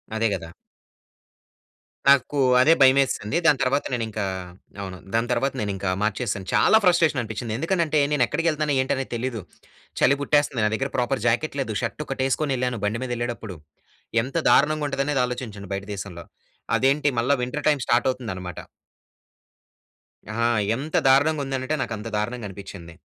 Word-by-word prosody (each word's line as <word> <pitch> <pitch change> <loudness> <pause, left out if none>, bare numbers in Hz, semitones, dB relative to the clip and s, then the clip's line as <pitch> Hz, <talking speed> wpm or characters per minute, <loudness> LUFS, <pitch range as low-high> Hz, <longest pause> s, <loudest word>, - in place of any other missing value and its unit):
అదే 115 +1 +2
కదా! 80 -3 -8 1.6
నాకు 140 +1 +4 0.2
అదే 160 +5 +6
భయమేసింది. 135 -1 +3
దాని 145 -4 +4
తర్వాత 140 +3 +1
నేను 120 -2 -1
ఇంకా, 105 -1 -3 0.6
అవును, 95 -2 -6 0.2
దాని 115 +1 +1
తర్వాత 130 +3 0
నేను 100 -1 -1
ఇంకా 95 0 -2
మార్చేశాను. 105 -2 -2
చాలా 220 - +5
ఫ్రస్ట్రేషన్ 170 -6 +3
అనిపించింది. 110 0 -5
ఎందుకనంటే 165 -1 +1
నేను 135 -4 +3
ఎక్కడికెళ్తనానో, 155 -2 0
ఏంటని 135 0 -1
తెలీదు. 120 -2 -3 0.6
చలి 140 +2 +4
పుట్టేస్తుంది. 145 -4 +1
నా 105 - +3
దగ్గర 135 +4 -3
ప్రాపర్ 125 +2 0
జాకెట్ 140 +5 0
లేదు. 110 -5 -3
ష‌ర్టు 125 +5 -3
ఒకటేసుకొనెళ్ళాను, 130 -2 -1
బండి 110 +4 -1
మీదెళ్ళేటప్పుడు. 120 -6 -4 0.7
ఎంత 135 +6 -4
దారుణంగా 150 +1 +3
ఉంటుందనేది, 140 -1 0
ఆలోచించండి 110 -6 -6
బయట 100 0 -4
దేశంలో. 90 -3 -8 0.5
అదేంటి 140 +2 +2
మళ్ళ 125 +4 +1
వింటర్ 145 +4 -4
టైమ్ 145 -3 +1
స్టార్ట్ 120 +1 +3
అవుతుందనమాట. 95 -9 -5 1.7
ఆహా! 115 +2 +1 0.3
ఎంత 145 +5 -5
దారుణంగా 145 +3 +4
ఉందనంటే 135 +2 -2
నాకు 115 - -3
అంత 105 +2 -7
దారుణంగా 110 +1 -3
అనిపించింది. 95 -3 -10
125 Hz, 140 wpm, -24 LUFS, 110-140 Hz, 1.7 s, అదే